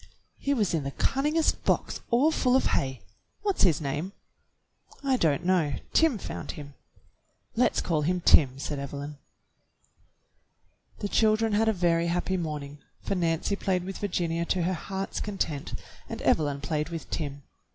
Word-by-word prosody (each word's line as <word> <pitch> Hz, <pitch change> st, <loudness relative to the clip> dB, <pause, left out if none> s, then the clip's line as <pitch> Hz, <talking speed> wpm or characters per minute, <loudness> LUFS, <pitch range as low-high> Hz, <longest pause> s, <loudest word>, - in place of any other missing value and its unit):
He 280 Hz, 0 st, +1 dB
was 210 Hz, -8 st, +1 dB
in 160 Hz, -3 st, 0 dB
the 140 Hz, -, -2 dB
cunningest 300 Hz, +4 st, +1 dB
box -, -, 0 dB
all 260 Hz, +7 st, +4 dB
full 255 Hz, -5 st, +2 dB
of 265 Hz, -, +3 dB
hay. 130 Hz, -2 st, -1 dB, 0.4 s
"What's 400 Hz, -2 st, 0 dB
his 170 Hz, -7 st, +5 dB
name.^" 150 Hz, +6 st, -3 dB, 0.9 s
"I 270 Hz, -1 st, +3 dB
don't 165 Hz, -, +1 dB
know. 175 Hz, -6 st, +2 dB, 0.2 s
Tim 320 Hz, -7 st, +4 dB
found -, -, -6 dB
him." 145 Hz, -4 st, -9 dB, 0.8 s
"Let's 245 Hz, +2 st, +3 dB
call 160 Hz, -4 st, 0 dB
him 180 Hz, +4 st, +1 dB
Tim," 135 Hz, -6 st, +5 dB
said 140 Hz, +1 st, -3 dB
Evelyn. 140 Hz, +1 st, -6 dB, 1.8 s
The 205 Hz, -, 0 dB
children 215 Hz, +1 st, +3 dB
had 220 Hz, +2 st, +3 dB
a -, -, +5 dB
very 170 Hz, -3 st, +2 dB
happy 180 Hz, +2 st, 0 dB
morning, 150 Hz, -4 st, -4 dB, 0.2 s
for -, -, -1 dB
Nancy 170 Hz, +1 st, 0 dB
played 185 Hz, -3 st, 0 dB
with 190 Hz, +1 st, -6 dB
Virginia 170 Hz, -4 st, -1 dB
to 180 Hz, 0 st, 0 dB
her 185 Hz, +2 st, +1 dB
heart's 190 Hz, +3 st, -4 dB
content, 165 Hz, -8 st, -3 dB, 0.3 s
and -, -, -5 dB
Evelyn 145 Hz, -2 st, +2 dB
played 150 Hz, +2 st, -1 dB
with 165 Hz, -2 st, -6 dB
Tim. 140 Hz, -3 st, -3 dB
175 Hz, 155 wpm, -28 LUFS, 150-205 Hz, 1.8 s, his